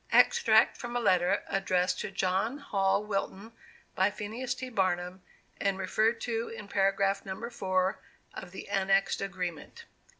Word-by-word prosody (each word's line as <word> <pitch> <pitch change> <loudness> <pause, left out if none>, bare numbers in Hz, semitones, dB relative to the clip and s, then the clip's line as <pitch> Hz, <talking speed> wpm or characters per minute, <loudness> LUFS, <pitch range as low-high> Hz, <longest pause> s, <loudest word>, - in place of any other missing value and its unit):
Extract 475 -1 +5
from 240 0 -6
a - - +2
Letter 185 -3 +2
addressed 185 -1 0
to - - -3
John 195 +6 0
Hall 200 -8 +1
Wilton 200 +1 -3 0.4
by 190 +2 +3
PHINEAS 220 +5 -4
T. 255 - -6
BARNUM, 185 -3 -1 0.4
_and 200 -1 +1
referred 215 +4 +1
to 230 -1 -2
in 220 -3 -8
paragraph 195 0 +1
No. 195 +4 -5
4 185 -4 0 0.3
of 180 - -8
the 190 - -9
annexed 195 0 +1
agreement. 185 - -5
195 Hz, 140 wpm, -30 LUFS, 190-220 Hz, 0.4 s, Extract